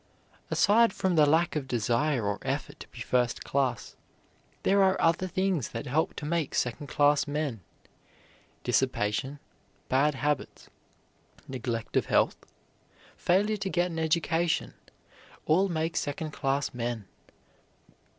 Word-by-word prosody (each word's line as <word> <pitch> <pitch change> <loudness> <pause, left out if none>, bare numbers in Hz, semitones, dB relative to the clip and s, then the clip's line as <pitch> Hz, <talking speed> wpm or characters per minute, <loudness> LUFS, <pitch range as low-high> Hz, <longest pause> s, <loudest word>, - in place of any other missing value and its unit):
Aside 225 +1 +4
from 190 -1 0
the 155 -3 +5
lack 160 +3 +2
of 145 -3 -2
desire 120 +2 0
or 100 0 -1
effort - - -4
to - - -10
be - - -11
first 125 -2 0
class, 130 -4 -1 0.7
there 200 +1 +4
are 190 0 +3
other 165 +3 +2
things 185 - 0
that 115 - -6
help 150 +5 0
to 150 - -6
make 160 -2 -1
second 125 +4 -1
class 145 +1 +3
men. 145 -7 -2 1.0
Dissipation, 125 +1 0 0.5
bad 140 +3 +3
habits, 145 0 -3 0.8
neglect 120 -3 -4
of - - +2
health, - - +2 0.8
failure 205 +4 +2
to 195 -1 -3
get 180 -1 0
an 165 - -4
education, 165 +1 0 0.7
all 190 +5 +3
make 165 -1 -2
second 150 +2 -2
class 140 0 -1
men. 120 -3 -3
150 Hz, 130 wpm, -28 LUFS, 125-170 Hz, 1.0 s, the